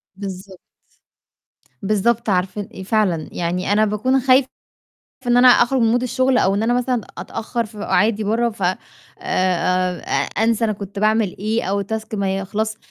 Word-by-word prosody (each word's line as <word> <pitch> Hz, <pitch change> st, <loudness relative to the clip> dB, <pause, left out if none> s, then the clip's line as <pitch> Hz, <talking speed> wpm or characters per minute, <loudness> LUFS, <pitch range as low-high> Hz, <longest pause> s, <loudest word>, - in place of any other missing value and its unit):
بالضبط. 190 Hz, -1 st, -8 dB, 1.2 s
بالضبط 215 Hz, +3 st, 0 dB
عارفة 185 Hz, +2 st, 0 dB
ال 195 Hz, -, -9 dB
إ -, -, -5 dB
فعلًا 190 Hz, -6 st, 0 dB
يعني 180 Hz, +3 st, -2 dB
أنا 215 Hz, +1 st, +4 dB
باكون 245 Hz, +6 st, +1 dB
خايفة 260 Hz, +1 st, +4 dB, 0.8 s
إن 245 Hz, 0 st, +4 dB
أنا 255 Hz, -, +7 dB
أخرج 250 Hz, +1 st, +5 dB
من 230 Hz, +2 st, +3 dB
mood -, -, -7 dB
الشغل 255 Hz, +1 st, +1 dB
أو 195 Hz, +1 st, +2 dB
إن 205 Hz, -, 0 dB
أنا 240 Hz, +2 st, +1 dB
مثلًا 250 Hz, -2 st, 0 dB, 0.2 s
أتأخّر 230 Hz, +1 st, -4 dB
في 215 Hz, 0 st, -14 dB
قعادي 210 Hz, +1 st, +1 dB
برّه، 230 Hz, +3 st, +1 dB
ف 215 Hz, -3 st, -13 dB
آآ 185 Hz, +1 st, +1 dB, 0.4 s
آآ 185 Hz, -, 0 dB, 0.4 s
أنسى 230 Hz, 0 st, +2 dB
أنا 215 Hz, -, 0 dB
كنت 200 Hz, 0 st, -7 dB
باعمل 215 Hz, -2 st, +1 dB
إيه 215 Hz, +3 st, -1 dB
أو 200 Hz, +2 st, -1 dB
task 220 Hz, +2 st, -5 dB
ما 195 Hz, -1 st, -1 dB
يخلصش، 215 Hz, +3 st, -3 dB
215 Hz, 165 wpm, -20 LUFS, 195-235 Hz, 1.2 s, أنا